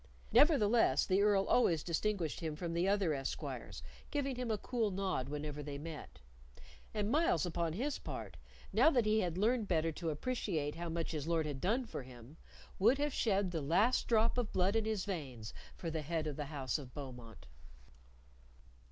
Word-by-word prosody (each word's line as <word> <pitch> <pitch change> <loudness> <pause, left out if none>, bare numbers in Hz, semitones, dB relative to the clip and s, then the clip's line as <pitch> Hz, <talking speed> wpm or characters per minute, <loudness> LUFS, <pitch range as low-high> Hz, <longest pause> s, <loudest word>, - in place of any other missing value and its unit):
Nevertheless, 240 -7 +5
the 190 +1 +2
Earl 205 -2 +4
always 170 -11 +3
distinguished 175 -1 -1
him 160 -2 -3
from 170 +1 -4
the 170 +2 +1
other 195 -5 +2
esquires, 135 -2 -5 0.3
giving 275 -3 -1
him 250 -1 -3
a 215 - +1
cool 230 0 -1
nod 185 -9 -2
whenever 150 0 -4
they 145 -1 -5
met; 155 - -8 0.7
and 210 0 -1
Myles, 330 - +3
upon 170 -2 -1
his 265 - -2
part - - -6 0.4
now - - +6
that 245 -8 +2
he 215 +1 +3
had 180 -4 -1
learned 220 +2 +2
better 165 -2 +1
to 165 +1 -3
appreciate 155 - -2
how 170 0 -5
much 165 0 -2
his 155 -2 -3
Lord 165 -2 +1
had 145 -3 -4
done 235 +7 +1
for 225 - -6
him 125 +3 -13 0.4
would 230 +8 +5
have 290 0 0
shed 200 -4 +1
the 165 -3 -2
last 195 - +2
drop 230 +1 +3
of 235 -4 -2
blood 190 +3 +2
in 225 -1 +2
his 215 -4 -1
veins 135 - -5 0.2
for 165 - -4
the 160 -1 -2
head 160 +1 -2
of 150 -2 -3
the 150 - -4
house 135 -4 -2
of 130 -3 -11
Beaumont. 125 -6 -9
175 Hz, 185 wpm, -35 LUFS, 150-220 Hz, 0.7 s, now